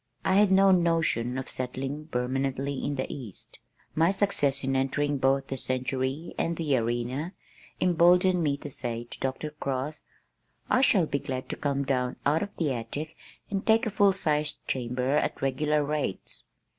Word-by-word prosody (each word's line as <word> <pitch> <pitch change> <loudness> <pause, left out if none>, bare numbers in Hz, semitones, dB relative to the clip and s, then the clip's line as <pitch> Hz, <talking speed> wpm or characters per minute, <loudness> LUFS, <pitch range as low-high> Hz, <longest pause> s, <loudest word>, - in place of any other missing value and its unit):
I - - +3
had 205 -1 +5
no 195 0 +6
notion 165 -9 +2
of 130 - -4
settling 135 +4 -3
permanently 135 +1 -2
in 145 - -1
the 130 - -1
east. 120 -9 -9 0.3
My 165 +2 +3
success 145 -9 +1
in 135 0 0
entering 140 +2 0
both 135 +1 +2
the 135 - -4
Century 130 +4 -2
and 170 0 0
the 150 -5 +1
Arena 120 - -2 0.5
emboldened 180 +1 +4
me 145 -3 +1
to 145 - -8
say 120 -2 -4
to 120 - -12
Dr. 135 +3 -3
Cross, 140 0 -3 0.7
"I 255 - +4
shall 200 -9 +4
be 140 -2 -1
glad 130 -1 -5
to - - -2
come 140 -1 -1
down 125 -2 0
out 150 +3 +3
of 205 - -2
the 150 -5 +1
attic 145 +7 -5 0.4
and 195 -1 -1
take 225 +2 +4
a 220 - -1
full 200 -1 +4
sized 150 -5 -1
chamber 125 +2 0
at - - -1
regular 150 +3 +1
rates." 145 -9 -3
140 Hz, 170 wpm, -28 LUFS, 130-165 Hz, 0.7 s, no